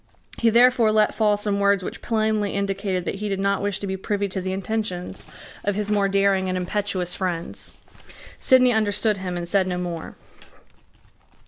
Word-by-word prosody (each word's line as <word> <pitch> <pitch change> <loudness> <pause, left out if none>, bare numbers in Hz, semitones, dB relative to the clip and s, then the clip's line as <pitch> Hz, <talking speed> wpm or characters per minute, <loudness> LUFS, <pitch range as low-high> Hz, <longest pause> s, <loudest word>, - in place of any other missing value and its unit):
He 230 - +4
therefore 235 -1 +5
let 215 -1 +3
fall 210 -2 +2
some 205 -1 0
words 200 -1 +3
which - - -6
plainly 215 -3 0
indicated 195 -2 -1
that - - -3
he 210 - -2
did 195 -1 -2
not 200 0 +1
wish 205 -1 -1
to - - -5
be 190 -1 -2
privy 200 +1 -1
to 190 0 -3
the 185 +1 -3
intentions 190 -1 -4 0.4
of 205 -1 0
his 210 0 -2
more 200 -1 +3
daring 195 -1 +2
and 185 - -1
impetuous 185 -1 -2
friends. 175 -3 -4 0.7
Sidney 255 -1 +5
understood 215 0 +1
him 180 -2 -4
and 170 0 -4
said 190 +1 +2
no 180 -1 -2
more. 175 -2 -5
200 Hz, 180 wpm, -23 LUFS, 185-210 Hz, 0.7 s, therefore